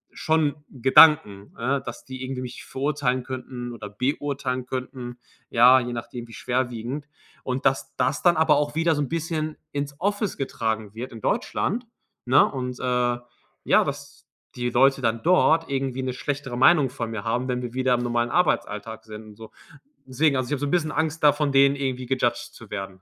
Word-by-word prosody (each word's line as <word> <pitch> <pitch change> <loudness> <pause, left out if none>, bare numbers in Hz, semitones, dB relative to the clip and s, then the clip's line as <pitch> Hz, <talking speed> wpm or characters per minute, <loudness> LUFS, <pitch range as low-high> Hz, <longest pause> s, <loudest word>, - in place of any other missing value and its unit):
schon 155 -3 +1
Gedanken, 130 -6 +5
ne, 135 +4 0
dass 120 -2 -8
die 130 0 -7
irgendwie 130 0 -4
mich 125 -1 -8
verurteilen 135 -2 -1
könnten 125 -1 -6
oder 105 -3 -8
beurteilen 130 +2 -2
könnten. 125 -1 -6 0.3
Ja, 125 +2 +7
je 125 -1 -4
nachdem, 120 0 -6
wie 115 - -14
schwerwiegend. 125 +4 -3 0.3
Und 130 +1 -3
dass 135 0 0
das 130 -2 0
dann 175 -2 +4
aber 160 -1 +4
auch 145 0 -1
wieder 165 +1 +2
so 145 - -1
'n 145 - -2
bisschen 160 -1 -3
ins 140 +1 -4
Office 205 +2 -1
getragen 110 -5 -3
wird 120 +4 -7
in 115 - -9
Deutschland, 235 - -1 0.4
ne, 130 +3 +6
und, 125 -2 -4
äh, 125 -1 +1 0.5
ja, - - +4
dass - - -7 0.3
die 125 0 -1
Leute 135 +3 +3
dann 115 -1 0
dort 165 -2 +4
irgendwie 135 -1 -2
'ne 130 -1 -2
schlechtere 135 -1 -4
Meinung 135 -1 +5
von 120 -4 -4
mir 110 -3 -5
haben, 120 +3 -1
wenn 125 -1 -2
wir 120 -1 -5
wieder 130 -1 +2
im 120 - -2
normalen 120 0 0
Arbeitsalltag 110 - -1
sind 110 0 -9
und 105 -1 -13
so. 110 +1 -11 0.6
Deswegen. 140 +2 +1
Also, 130 0 -2
ich - - -8
habe 145 - -1
so 145 - -1
'n - - -3
bisschen 160 -3 +1
Angst, 160 0 -2
da 150 - +8
von 145 -1 0
denen 140 0 +5
irgendwie 130 -2 -3
gejudged 120 -1 -1
zu 115 - -13
werden. 95 -2 -6
130 Hz, 190 wpm, -24 LUFS, 120-145 Hz, 0.6 s, da